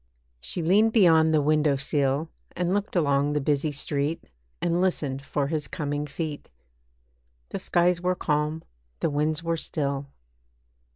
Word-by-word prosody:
She 165 Hz, -, -2 dB
leaned 210 Hz, +7 st, +4 dB
beyond 160 Hz, -7 st, +5 dB
the 155 Hz, -2 st, +3 dB
window 150 Hz, -1 st, +3 dB
sill, 140 Hz, +2 st, 0 dB, 0.3 s
And 180 Hz, +1 st, 0 dB
looked 205 Hz, +1 st, -2 dB
along 145 Hz, -3 st, +2 dB
the 150 Hz, -, +1 dB
busy 145 Hz, +1 st, 0 dB
street, 145 Hz, +2 st, -2 dB, 0.4 s
And 175 Hz, +1 st, +1 dB
listened 145 Hz, -7 st, 0 dB
for 140 Hz, +1 st, -2 dB
his 150 Hz, -1 st, -2 dB
coming 145 Hz, 0 st, -3 dB
feet. 150 Hz, 0 st, -5 dB, 1.0 s
The -, -, -4 dB
skies 175 Hz, 0 st, +2 dB
were 180 Hz, 0 st, +1 dB
calm, 150 Hz, 0 st, -1 dB, 0.4 s
the -, -, +1 dB
winds 150 Hz, +2 st, 0 dB
were 165 Hz, 0 st, 0 dB
still. 140 Hz, -3 st, -3 dB
155 Hz, 140 wpm, -26 LUFS, 145-170 Hz, 1.0 s, beyond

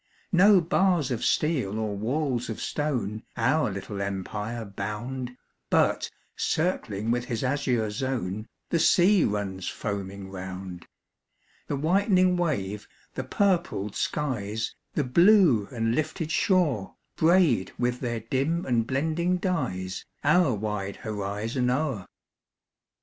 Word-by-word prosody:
No 190 Hz, +1 st, +6 dB
bars 170 Hz, -4 st, +2 dB
of 120 Hz, -, -2 dB
steel 130 Hz, -10 st, +1 dB
or 110 Hz, -2 st, -2 dB
walls 125 Hz, +3 st, -1 dB
of 110 Hz, -, -4 dB
stone 120 Hz, -8 st, -2 dB, 0.2 s
Our 130 Hz, +3 st, +2 dB
little 100 Hz, +1 st, -5 dB
empire 105 Hz, +4 st, -3 dB
bound, 115 Hz, +6 st, -5 dB, 0.3 s
But, -, -, +2 dB, 0.3 s
circling 115 Hz, -, -1 dB
with 120 Hz, 0 st, 0 dB
his 115 Hz, -1 st, -3 dB
azure 125 Hz, -5 st, 0 dB
zone, 110 Hz, -4 st, -3 dB, 0.2 s
The 170 Hz, -, +2 dB
sea 185 Hz, +3 st, +5 dB
runs 100 Hz, -3 st, -2 dB
foaming 100 Hz, -2 st, -5 dB
round; 95 Hz, -1 st, -7 dB, 0.8 s
The -, -, -1 dB
whitening 185 Hz, +4 st, +3 dB
wave, 105 Hz, -, -2 dB, 0.3 s
the 130 Hz, -, -3 dB
purpled 170 Hz, -, 0 dB
skies, 110 Hz, -7 st, -2 dB, 0.2 s
The 150 Hz, -, +2 dB
blue 170 Hz, -, +5 dB
and 115 Hz, -2 st, 0 dB
lifted 155 Hz, +3 st, -2 dB
shore, 160 Hz, -, +1 dB, 0.2 s
Braid 160 Hz, -, +3 dB
with 125 Hz, 0 st, 0 dB
their 120 Hz, -3 st, -2 dB
dim 140 Hz, +9 st, -1 dB
and 115 Hz, -3 st, +1 dB
blending 160 Hz, +7 st, 0 dB
dyes 115 Hz, -, -2 dB, 0.2 s
Our 155 Hz, -3 st, +4 dB
wide 105 Hz, -1 st, -3 dB
horizon 110 Hz, +4 st, -2 dB
o'er. 130 Hz, -6 st, -1 dB
125 Hz, 115 wpm, -27 LUFS, 105-155 Hz, 0.8 s, No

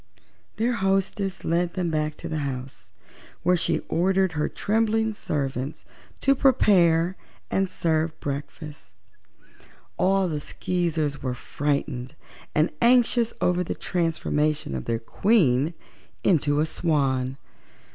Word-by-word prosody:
Their 230 Hz, +4 st, +1 dB
hostess 195 Hz, -2 st, -1 dB
led 170 Hz, +1 st, 0 dB
them 180 Hz, -3 st, -1 dB
back 155 Hz, -1 st, -1 dB
to -, -, -7 dB
the 155 Hz, -, -2 dB
house, 135 Hz, -2 st, -6 dB, 0.5 s
where 180 Hz, -, +4 dB
she 170 Hz, -2 st, 0 dB
ordered 190 Hz, +1 st, +2 dB
her 150 Hz, -1 st, -1 dB
trembling 220 Hz, +1 st, +1 dB
servants 135 Hz, -6 st, -3 dB, 0.4 s
to 275 Hz, -, +4 dB
prepare 185 Hz, -10 st, +4 dB, 0.4 s
and 190 Hz, -1 st, +1 dB
serve 160 Hz, -2 st, -1 dB
breakfast. 145 Hz, -, -6 dB, 1.0 s
All 195 Hz, 0 st, +3 dB
the 155 Hz, -3 st, -2 dB
Skeezers 160 Hz, -3 st, -2 dB
were 125 Hz, -2 st, -2 dB
frightened 140 Hz, 0 st, -2 dB, 0.4 s
and 155 Hz, +3 st, +3 dB
anxious 240 Hz, -1 st, +4 dB
over 180 Hz, 0 st, +2 dB
the -, -, -4 dB
transformation 155 Hz, -, -1 dB
of 65 Hz, -1 st, -4 dB
their 115 Hz, -, 0 dB
Queen 150 Hz, -, +2 dB, 0.5 s
into 150 Hz, -5 st, +3 dB
a -, -, +2 dB
swan. 135 Hz, -5 st, 0 dB
165 Hz, 115 wpm, -25 LUFS, 145-190 Hz, 1.0 s, where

